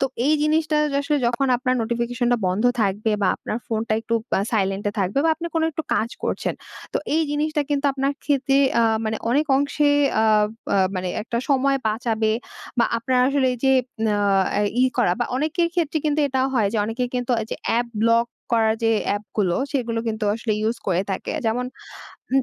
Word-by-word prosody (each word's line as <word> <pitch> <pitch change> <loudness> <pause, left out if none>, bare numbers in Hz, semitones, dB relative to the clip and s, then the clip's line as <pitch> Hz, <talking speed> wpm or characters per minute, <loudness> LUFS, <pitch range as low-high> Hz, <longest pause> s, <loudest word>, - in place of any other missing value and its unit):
তো 270 - +3 0.2
এই 305 - +4
জিনিসটা 310 0 +1 0.2
য - - -3
আসলে 295 +1 0
যখন 245 +3 0
আপনার 255 0 0
নোটিফিকেশনটা 240 +1 0
বন্ধ 190 +6 0 0.2
থাকবে 205 +3 0
বা - - +3
আপনার 215 - -4
ফোনটা 220 -1 -2
একটু 230 +1 -2 0.2
বা - - +3
সাইলেন্ট 195 -2 0
এ - - -17
থাকবে 195 +7 0
বা 325 - +4
আপনি 335 +2 -6
কোনো 320 0 +2
একটু 320 +1 -4
কাজ 230 +2 0
করছেন। - - -2 0.4
তো - - +1 0.2
এই 325 - +3
জিনিসটা 300 +1 0
কিন্তু 285 0 0
আপনার 275 +1 0
খেতে 275 -1 +2 0.2
আ - - +4 0.2
মানে 220 0 -1
অনেক 295 +5 +2
অংশে 285 +1 +1 0.3
আ - - +3 0.4
বা 200 - +1 0.2
মানে 185 0 -2
একটা 235 +1 -3
সময় 275 0 +3
বাঁচাবে 220 -1 0 0.5
বা 235 - +5
আপনার 255 +2 0
আসলে 275 -1 +2
এই 250 - -5
যে, 265 - +5 0.3
ন - - +2 0.5
এই, 205 - +1
ই - - +6
করা 230 -8 +3
বা - - +2
অনেকের 315 +5 0
ক্ষেত্রে 325 -2 0
কিন্তু 300 0 +1
এটাও 265 0 +1
হয় 215 -5 +2
যে, 225 - -1
অনেকে 230 +3 -2
কিন্তু 245 0 -2
ওইযে 220 - -5
অ্যাপ 240 +1 +1
ব্লক 230 +1 +3 0.3
করার 220 -1 +3
যে, 225 - +3 0.2
অ্যাপগুলো 205 -3 -1 0.2
সেগুলো 235 -5 -1
কিন্তু 220 -1 -2
আসলে 225 -1 -2
ইউজ 225 +2 0
করে 180 +1 +1
থাকে 190 - -3 0.2
যেমন 240 +3 0 0.7
উম 270 - +4
240 Hz, 195 wpm, -22 LUFS, 220-280 Hz, 0.7 s, ই